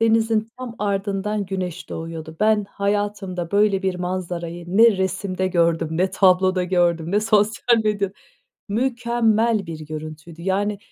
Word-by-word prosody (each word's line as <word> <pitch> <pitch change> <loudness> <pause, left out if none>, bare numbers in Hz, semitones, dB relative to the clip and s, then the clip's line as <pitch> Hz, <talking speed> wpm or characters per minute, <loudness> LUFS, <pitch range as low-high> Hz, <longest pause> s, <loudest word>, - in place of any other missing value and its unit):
denizin 225 -1 +2
tam 250 -2 -6
ardından 200 +1 -1
güneş 185 -3 -4
doğuyordu. 160 -1 -7
Ben, 215 -1 +3
hayatımda 200 -4 -2
böyle 205 -1 +3
bir 190 -1 0
manzarayı 175 -1 -4
ne 225 -1 +7
resimde 190 0 -1
gördüm 170 -2 +1
ne 180 +4 +1
tabloda 185 -1 +3
gördüm 175 -2 +1
ne 205 - +3
sosyal 220 +2 +3
medya 200 -2 0 0.6
Mükemmel 235 -2 +1
bir 160 -1 -7
görüntüydü. 155 +2 -8
Yani 200 +2 0
195 Hz, 125 wpm, -22 LUFS, 175-210 Hz, 0.6 s, ne